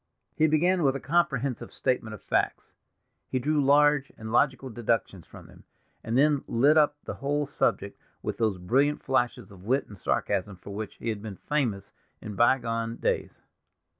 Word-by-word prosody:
He 155 - +4
began 175 +4 +2
with 135 -3 +2
a - - -2
comprehensive 140 -5 0
statement 120 -4 -1
of - - -16
facts, - - -1 0.6
he - - -1
drew 145 +3 +1
large 145 0 +4
and 110 0 -7
logical 130 +1 +1
deductions 110 -6 -2
from - - -13
them, - - -17 0.4
and 115 +2 -1
then 145 0 +3
lit 140 +6 +4
up 150 -1 +4
the - - -5
whole 145 +1 -1
subject 145 - -1 0.2
with - - -4
those 110 -4 +1
brilliant 135 +11 +1
flashes 125 -5 -1
of 95 -2 -14
wit 130 +5 +1
and 105 -3 -13
sarcasm 100 +2 -1
for 95 +3 -11
which 105 0 -6
he 115 - -5
had 110 -2 -3
been 105 -3 -7
famous 125 -10 -2 0.3
in 105 - -7
bygone 115 0 +1
days. - - -2
130 Hz, 170 wpm, -27 LUFS, 110-145 Hz, 0.6 s, He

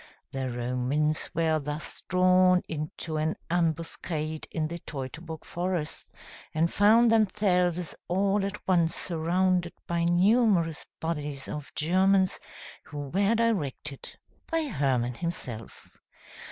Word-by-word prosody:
The 135 -1 -2
Romans 125 +5 0
were 160 -1 +2
thus 150 +1 -5
drawn 185 0 +5
into 155 +1 -4
an 155 +1 0 0.2
ambuscade 160 -2 -1
in 155 -2 -1
the 170 +2 -6
Teutoburg 160 +3 -7
forest, 175 -3 -3 0.5
and 165 +2 +2
found 225 +3 +6
themselves 185 -5 +2
all 195 +2 +2
at 200 +1 -5
once 170 -3 +3
surrounded 175 +1 +1
by 170 0 0
numerous 180 -2 +3
bodies 150 -4 -3
of 150 -1 -6
Germans, 185 +4 +3 0.5
who 145 -2 -6
were 200 +7 +2
directed 155 - -2 0.3
by 330 -1 +1
Hermann 130 - +1
himself. 125 -7 -5
170 Hz, 110 wpm, -28 LUFS, 150-185 Hz, 0.5 s, found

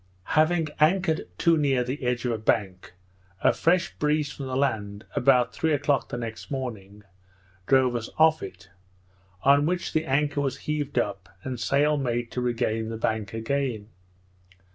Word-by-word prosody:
Having 155 +1 +3
anchored 160 +1 +2
too 170 -1 +3
near 135 -4 +2
the 130 +4 -4
edge 125 0 -1
of 120 - +1
a 115 - -1
bank, 100 -5 -1 0.5
a - - +4
fresh 175 +2 +1
breeze 150 -1 +1
from 140 -2 -7
the 130 - -3
land, 105 -7 -1
about 125 -1 +3
three 160 -1 0
o'clock 145 -1 +1
the 120 - -4
next 115 -2 -6
morning, 105 -7 -6 0.6
drove 130 -2 +4
us 115 -1 -3
off 160 0 +5
it; 95 0 -10 0.7
on 140 +2 +5
which 180 +1 -2
the 155 0 +1
anchor 145 +1 +1
was 135 -3 -2
heaved 150 -2 -2
up, 95 -2 -1
and 130 -2 -4
sail 145 +7 +2
made 120 -3 -2
to 125 - -3
regain 115 -2 -1
the 115 - -4
bank 110 -2 -2
again. 115 -2 -2
130 Hz, 165 wpm, -26 LUFS, 115-150 Hz, 0.7 s, off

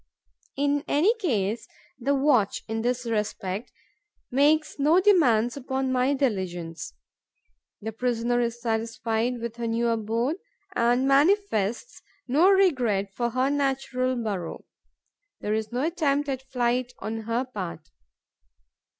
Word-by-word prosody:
In 285 +1 +1
any 345 +10 +3
case, 225 - -1 0.3
the 275 +3 +1
watch, 265 -8 +2
in 225 0 -2
this 250 +1 -1
respect, 210 -2 -3 0.6
makes 300 +4 +2
no 310 +5 +5
demands 250 - +4
upon 265 -1 -2
my 260 +2 +2
diligence. 175 - -3 0.9
The 220 - -3
prisoner 240 +1 0
is 235 0 -2
satisfied 230 +1 -1
with 235 0 -5
her 235 -1 -3
new 230 +1 +1
abode 230 - 0 0.4
and 245 +3 +2
manifests 280 - +2 0.3
no 305 +9 +4
regret 250 - +2
for 240 +2 -1
her 255 +3 +1
natural 270 -2 0
burrow. 200 -8 -4 0.7
There 210 - -2
is 220 0 -2
no 250 +3 -1
attempt 295 -4 0
at 265 -1 -2
flight 245 0 0
on 220 +1 -4
her 235 +3 0
part. 180 -10 -7
245 Hz, 125 wpm, -26 LUFS, 225-275 Hz, 0.9 s, no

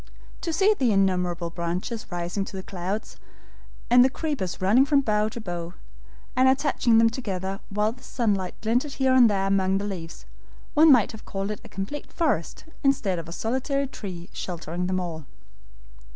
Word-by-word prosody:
To 335 - -2
see 390 +6 +4
the 255 - +1
innumerable 180 -3 +1
branches 180 +7 -3
rising 175 +2 -2
to 195 - -8
the 190 - -6
clouds, 190 +4 -5 0.7
and 245 +1 +7
the 260 - +4
creepers 270 - -3
running 210 +8 +5
from 285 0 +3
bough 215 -3 +1
to 235 - -7
bough, 175 -4 -5 0.6
and 260 +1 +5
attaching 265 -4 +3
them 225 0 +5
together 195 -5 -4
while 210 +2 +1
the 250 +2 -14
sunlight 205 -8 -1
glinted 245 +6 0
here 265 -1 +2
and 250 -3 +7
there 195 -2 0
among 195 -1 +2
the 200 - -3
leaves, 170 -5 -6 0.5
one 310 +1 +7
might 245 -6 +5
have 220 - -11
called 195 +1 -3
it 210 - -6
a - - -12
complete 235 +10 -6
forest 270 - -1 0.2
instead 225 -10 +2
of 165 0 -8
a - - -7
solitary 260 - -1
tree 185 -9 -7
sheltering 175 0 -4
them 185 0 0
all. 165 -4 -5
205 Hz, 175 wpm, -25 LUFS, 185-255 Hz, 0.7 s, and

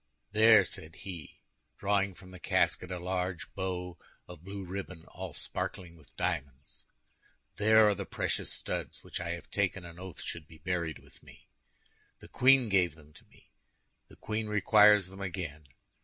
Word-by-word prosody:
"There," 110 +1 +7
said 80 0 -4
he, 90 -5 -9 0.3
drawing 100 -1 +1
from 95 0 -14
the 90 - -11
casket 90 - +1
a 90 - -3
large 90 0 -3
bow 90 -2 -4 0.3
of 90 -2 -11
blue 100 0 -6
ribbon 90 -2 -6
all 90 -3 -8
sparkling 90 -3 -4
with 80 -3 -20
diamonds, 70 0 -3 0.7
"there 110 +1 +6
are 105 - +4
the - - -6
precious - - -1
studs - - -4
which - - -5
I 85 - -4
have 85 - -9
taken 100 -2 0
an 85 0 -11
oath 95 -3 -8
should 85 -3 -5
be 80 - -14
buried 85 0 -2
with - - -19
me. - - -17 0.7
The - - -14
queen 130 -1 +5
gave 90 -6 +2
them 75 -1 -18
to - - -17
me, - - -24 0.6
the - - -16
queen 110 0 -3
requires 105 -1 +6
them 95 +1 -10
again. 85 -6 -5
90 Hz, 165 wpm, -31 LUFS, 85-100 Hz, 0.7 s, There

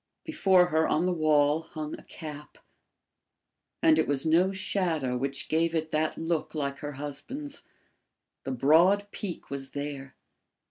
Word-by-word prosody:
Before 190 - +3
her 160 0 +2
on 160 +3 +1
the 180 - +1
wall 155 -1 +3
hung 155 -2 -7
a - - -13
cap, 150 -2 -10 1.3
and 320 -1 +5
it - - +2
was 140 +1 0
no 170 +4 +4
shadow 175 -9 -1
which 135 +2 -3
gave 165 +1 +1
it 160 0 -2
that 155 0 0
look 165 -1 -2
like 140 -2 -2
her 145 0 -5
husband's; 235 - -7 0.8
the - - -5
broad 170 +10 +4
peak 185 -8 -6
was 135 -1 -4
there. 140 -2 -5
155 Hz, 145 wpm, -28 LUFS, 145-180 Hz, 1.3 s, and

